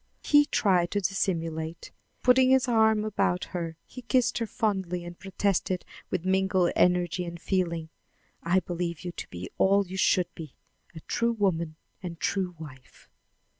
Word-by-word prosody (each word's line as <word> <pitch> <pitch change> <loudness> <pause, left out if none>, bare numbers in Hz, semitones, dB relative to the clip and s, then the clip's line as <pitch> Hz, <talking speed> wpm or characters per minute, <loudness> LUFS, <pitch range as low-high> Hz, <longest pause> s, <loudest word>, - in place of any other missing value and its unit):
He 290 0 +5
tried 180 -4 +2
to 205 - 0
dissimulate. 165 -4 -2 0.3
Putting 255 +1 +5
his 260 -1 +4
arm 220 -2 +3
about 180 -4 0
her, 165 -2 -4
he 250 - -10
kissed 250 0 +1
her 230 - -2
fondly 190 -5 -2
and 175 0 -9
protested 190 -1 -1 0.2
with 170 - -2
mingled 190 -1 +2
energy 180 0 +2
and 170 -1 -7
feeling: 170 -3 -1 0.5
"I 180 +3 +2
believe 170 -2 -4
you 175 - -5
to - - -7
be 90 +1 -8
all 200 +1 +4
you 190 +1 -7
should 185 -1 +2
be 155 -5 -10 0.4
a 160 - -8
true 235 +5 0
woman 170 -7 0 0.3
and 170 -3 -7
true 185 -1 -1
wife." 130 -5 -13
180 Hz, 155 wpm, -27 LUFS, 170-205 Hz, 0.5 s, He